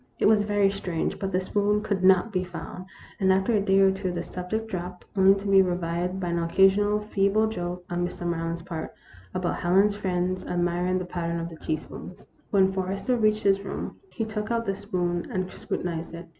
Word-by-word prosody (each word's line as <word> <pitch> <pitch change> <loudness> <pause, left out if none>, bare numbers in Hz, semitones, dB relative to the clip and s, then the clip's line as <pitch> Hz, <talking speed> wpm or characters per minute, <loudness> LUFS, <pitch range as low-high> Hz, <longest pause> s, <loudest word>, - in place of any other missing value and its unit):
It - - +1
was 210 -1 +5
very 205 -1 +3
strange, 180 -4 -3
but 195 -1 -2
the 185 - +2
spoon 205 +2 +1
could 200 -3 -1
not 190 +3 +5
be 185 -1 +1
found, 185 +1 -8 0.3
and 190 -2 +4
after 190 +5 +2
a 210 - +3
day 195 -1 +3
or 195 0 +6
two 190 -1 -2
the 175 - -3
subject 215 +5 -4
dropped, 180 -3 -6
only 195 0 +6
to 200 +1 -5
be 195 -1 +6
revived 180 0 -1
by 180 -2 -2
an 170 0 0
occasional 195 +5 +3
feeble 210 0 +2
joke, 180 -4 -4
on 175 0 -2
Mr. 175 0 -4
Maryland's 165 0 -2
part, 165 -3 -6 0.4
about 180 -1 -1
Helen's 195 +4 +3
friends 185 -2 -1
admiring 175 +1 0
the 185 - -3
pattern 170 -1 -3
of 165 0 -4
the 165 - -10
teaspoons. 155 +3 -6 0.2
When 190 -2 +4
Forrester 195 +6 -1
reached 215 -2 +2
his 195 0 +3
room, 195 - -5
he 225 - -3
took 215 -1 -4
out 230 0 0
the 195 - 0
spoon 180 -4 -2
and 185 0 -2
scrutinized 170 -1 -4
it. 170 +1 -8
185 Hz, 200 wpm, -26 LUFS, 175-200 Hz, 0.4 s, or